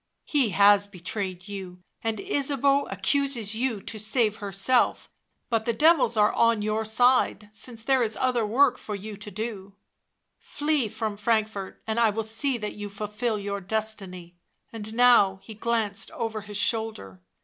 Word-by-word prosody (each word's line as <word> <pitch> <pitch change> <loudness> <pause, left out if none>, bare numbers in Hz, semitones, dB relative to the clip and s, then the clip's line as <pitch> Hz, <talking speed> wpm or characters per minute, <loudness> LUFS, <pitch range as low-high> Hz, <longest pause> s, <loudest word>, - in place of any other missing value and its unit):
" - - -53
He 275 -7 +2
has 205 +1 +5
betrayed 185 0 -5
you, 185 -3 -8 0.2
and 225 -1 -2
Ysabeau 280 -6 +1
accuses 225 +2 0
you 230 -3 -2
to 220 - -5
save 215 0 +1
herself; 200 +4 0 0.4
but 225 -2 0
the 235 - +1
devils 295 -4 +4
are 210 0 +4
on 230 -2 +2
your 215 +1 0
side 225 -2 +2
since 225 0 -7
there 265 +2 +3
is 220 -2 -1
other 250 -3 +1
work 250 +4 +3
for 210 - -5
you 210 +2 -7
to 210 0 -8
do; 200 -2 -6 0.6
flee 295 -5 -1
from 215 -1 -4
Frank 220 0 +2
fort, 195 -3 -8
and 220 +1 -1
I 230 -2 +5
will 220 +2 -2
see 225 +4 -1
that 210 -2 -5
you 205 0 -7
fulfil 210 +3 -3
your 200 0 -4
destiny." 195 -4 -3 0.4
And 220 -1 -3
now 235 -6 +5
he 220 - -10
glanced 220 -2 -2
over 225 -2 -4
his 205 0 -4
shoulder. 215 - -1
220 Hz, 165 wpm, -26 LUFS, 205-235 Hz, 0.6 s, has